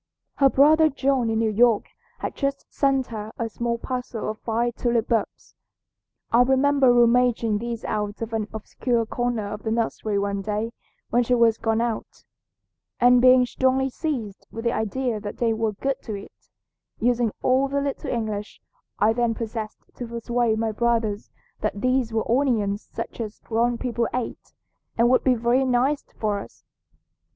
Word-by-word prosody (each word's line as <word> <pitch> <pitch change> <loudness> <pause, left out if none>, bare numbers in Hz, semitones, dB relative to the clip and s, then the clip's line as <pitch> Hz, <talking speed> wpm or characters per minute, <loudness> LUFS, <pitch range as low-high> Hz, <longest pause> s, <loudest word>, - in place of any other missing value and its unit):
Her 275 -1 +5
brother 310 +4 +5
John 265 -4 +1
in 220 - 0
New 220 -1 +1
York 230 0 +3 0.4
had - - -3
just 275 0 -2
sent 270 -2 +2
her 215 0 -5
a 230 - -2
small 235 +1 -2
parcel 245 -3 -4
of 215 - -11
fine 235 +1 0
tulip 235 -1 -1
bulbs. 225 -3 -2 0.8
I 235 - +5
remember 265 +1 +4
rummaging 240 -2 +3
these 235 0 -5
out 210 -1 -2
of 225 0 -6
an 215 -2 -1
obscure 230 +2 -1
corner 230 -3 -2
of 210 - -7
the 220 - -3
nursery 220 -2 -1
one 200 0 -1
day 215 +3 -3 0.4
when 240 - +4
she 245 +1 +2
was 230 -2 +3
gone 225 0 +1
out, 235 -2 -4 0.8
and 245 0 +6
being 255 0 +6
strongly 260 +1 +1
seized 245 - -4
with 225 - -7
the 235 - +1
idea 225 +1 -1
that 205 0 -7
they 230 -2 +1
were 220 -1 -1
good 270 +6 -2
to 215 - -5
eat, 200 - -12 0.5
using 240 -1 +2
all 260 +2 +3
the 280 +1 -1
little 280 -1 -3
English 215 -3 -3 0.4
I 215 +2 +3
then 235 -1 0
possessed 220 -1 -5
to 245 - -5
persuade 235 -1 0
my 225 0 0
brothers 225 -2 0 0.3
that 210 -1 -2
these 255 0 +1
were 220 0 -1
onions 225 -6 +1
such 230 +1 -5
as 215 -2 -6
grown 235 +1 0
people 235 -2 -1
ate 250 -2 -5 0.4
and 235 +1 +4
would 255 - +4
be 255 -2 +4
very 240 +3 +2
nice 265 +3 +1 0.2
for 210 -2 -1
us. - - -12
235 Hz, 170 wpm, -24 LUFS, 220-250 Hz, 0.8 s, and